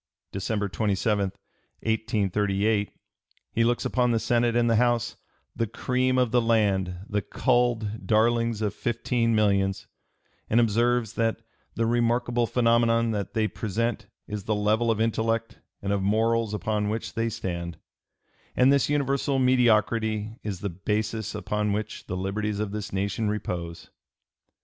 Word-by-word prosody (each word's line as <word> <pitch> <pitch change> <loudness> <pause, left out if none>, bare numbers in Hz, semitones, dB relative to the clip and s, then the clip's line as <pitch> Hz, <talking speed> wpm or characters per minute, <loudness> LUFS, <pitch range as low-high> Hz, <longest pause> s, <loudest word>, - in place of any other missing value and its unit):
December 100 +1 -2
27, 100 +2 0 0.6
1838, 105 -1 0 0.6
he 115 - +1
looks 120 +1 +1
upon 125 -1 +1
the 115 - +2
Senate 120 +1 +1
and 120 0 +3
the 115 -1 +3
House, 120 -1 +1 0.4
"the 115 - -1
cream 130 +4 0
of 125 -3 +2
the 120 0 +4
land, 100 -6 +1
the 105 -1 -1
culled 120 -2 0
darlings 115 0 +2
of 105 - 0
fifteen 120 0 0
millions," 100 -2 +1 0.6
and 115 - +4
observes 115 0 +2
that 115 0 -1 0.3
"the 115 - +1
remarkable 120 0 +1
phenomenon 115 -1 +3
that 100 0 -4
they 110 -1 +2
present 110 0 -2 0.2
is 105 -2 -5
the 110 - 0
level 110 +3 +1
of 110 -2 +1
intellect 115 0 0 0.2
and 100 0 0
of 100 - 0
morals 110 +2 +1
upon 105 -1 -1
which 110 +1 -3
they 115 0 0
stand; 85 -5 -4 0.8
and 130 +2 +5
this 140 - +2
universal 140 -1 +1
mediocrity 110 -4 +2
is 100 -4 -5
the 100 - -2
basis 105 +4 -2
upon 105 0 -1
which 105 0 -4
the 90 - -3
liberties 100 +2 -2
of 105 -2 -2
this 105 0 -5
nation 100 +3 -1
repose." 90 -5 -4
110 Hz, 140 wpm, -26 LUFS, 105-115 Hz, 0.8 s, and